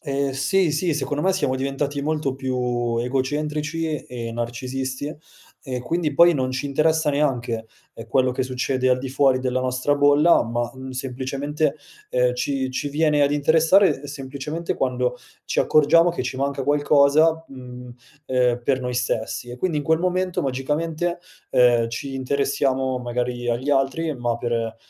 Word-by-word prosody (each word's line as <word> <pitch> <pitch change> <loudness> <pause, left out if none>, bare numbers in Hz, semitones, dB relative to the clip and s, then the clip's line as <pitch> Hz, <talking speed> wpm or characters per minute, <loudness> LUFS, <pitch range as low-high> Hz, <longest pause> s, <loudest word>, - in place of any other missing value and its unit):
Ehm, 140 0 -1
sì, 145 +7 +1
sì 160 +2 0
secondo 145 0 -2
me 190 - +3
siamo 145 -8 0
diventati 140 +2 -2
molto 150 -2 -1
più 125 -3 -1
egocentrici 150 +5 -2
e 120 -2 -6
narcisisti 130 +4 -4 0.5
e 130 -4 -5
quindi 155 +3 -1
poi 170 +3 +6
non 130 -2 -1
ci 130 +2 -2
interessa 155 +2 +2
neanche, 125 -6 -1 0.3
ehm, 115 - -9
quello 130 +2 +2
che 130 +1 -2
succede 130 0 -1
al 125 0 +3
di 135 - -5
fuori 130 -1 +2
della 130 0 -1
nostra 130 +3 0
bolla, 145 +4 +5
ma, 120 +1 -2
mhmm, 130 0 -9
semplicemente, 135 +3 -2 0.4
ehm, 125 0 +2
ci 130 +1 -2
ci 130 +3 -3
viene 150 0 +2
ad 140 - +3
interessare 160 +1 +3
semplicemente 140 +4 -5
quando 125 -1 -1 0.3
ci - - -2
accorgiamo 165 +3 +5
che 175 - -3
ci 130 - -4
manca 140 0 -1
qualcosa, 145 +3 +3
mhmm, 125 -1 -10 0.4
ehm, 125 -2 +1
per 130 +1 +1
noi 125 -1 -3
stessi; 120 0 -2
e 120 - -7
quindi 160 +3 -1
in - - -2
quel 160 +3 +2
momento 185 0 -1
magicamente, 155 +6 -2 0.3
ehm, 120 -2 +4
ci 135 +4 -5
interessiamo 135 -1 0
magari 120 0 -3
agli 120 +4 -2
altri, 145 +3 +1
ma 120 -2 -1
per, 115 -1 -2
135 Hz, 155 wpm, -23 LUFS, 125-150 Hz, 0.5 s, poi